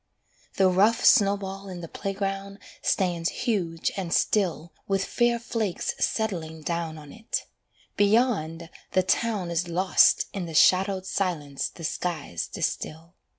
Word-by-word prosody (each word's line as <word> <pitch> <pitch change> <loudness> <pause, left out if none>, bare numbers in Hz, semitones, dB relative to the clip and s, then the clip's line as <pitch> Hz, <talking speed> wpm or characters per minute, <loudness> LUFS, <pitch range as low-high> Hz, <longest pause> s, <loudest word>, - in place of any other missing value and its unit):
The 190 - +4
rough 205 +6 +3
snowball 195 -3 +3
in 180 -2 -7
the 165 - -6
playground 195 +1 -4 0.2
stands 175 -3 +1 0.2
huge 175 -8 0
and 185 -4 -4
still 170 -6 +1
With 195 -1 0
fair 240 -1 +2
flakes 225 -5 -2
settling 165 -8 -2
down 170 -1 -3
on 150 -2 -11
it. 225 +1 -3 0.5
Beyond, 200 -7 +1 0.2
the 185 - +3
town 200 -2 0
Is 170 +1 -1
lost 180 +2 +4
in 185 -4 -4
the 165 - -7
shadowed 190 +3 +4
silence 155 -8 -2
the 170 - -12
skies 155 - -3
distil. 165 +3 -4
185 Hz, 130 wpm, -26 LUFS, 165-200 Hz, 0.5 s, The